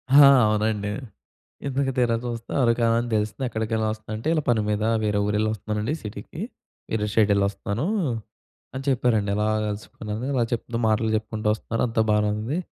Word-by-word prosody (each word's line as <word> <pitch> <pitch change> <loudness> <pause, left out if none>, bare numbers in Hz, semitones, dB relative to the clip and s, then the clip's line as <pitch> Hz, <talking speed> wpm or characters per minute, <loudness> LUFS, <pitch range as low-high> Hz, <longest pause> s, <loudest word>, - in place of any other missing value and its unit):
హా! 145 -1 +10 0.2
అవునండి. 105 -1 0 0.8
ఇంతకు 135 0 0
తీరాచూస్తే 120 -1 -1
అరకు 120 -2 +3
వ్యాలీ 115 0 +4
అని 120 - -4
తెలిసింది. 110 +4 -1
ఎక్కడికెళ్ళి 110 -1 -1
వస్తుందంటే 110 +3 -5
"ఇలా 155 - +1
పని 120 -3 +4
మీద 105 0 0 0.2
వేరే 105 -1 +1
ఊరెళ్లి 105 +1 +1
వస్తున్నానండి, 105 +3 -2
సిటీకి. 105 +8 -8 0.5
వేరే 105 -1 0
స్టేట్ 110 -1 +3
వెళ్లొస్తూన్నాను" 100 +4 0 0.9
అని 130 - -4
చెప్పారండి. 115 -6 +2
ఇలా 105 0 +1 0.2
కలుసుకున్నాను 105 +2 -5
ఇలా 130 -3 +2
చెప్తూ 115 0 -2
మాటలు 110 0 +2
చెప్పుకుంటూ 110 0 -3
వస్తున్నారు. 115 +1 -3
అంతా 115 -1 +1
బానే 105 0 +3
ఉంది. 115 +10 -2
110 Hz, 150 wpm, -24 LUFS, 105-120 Hz, 0.9 s, హా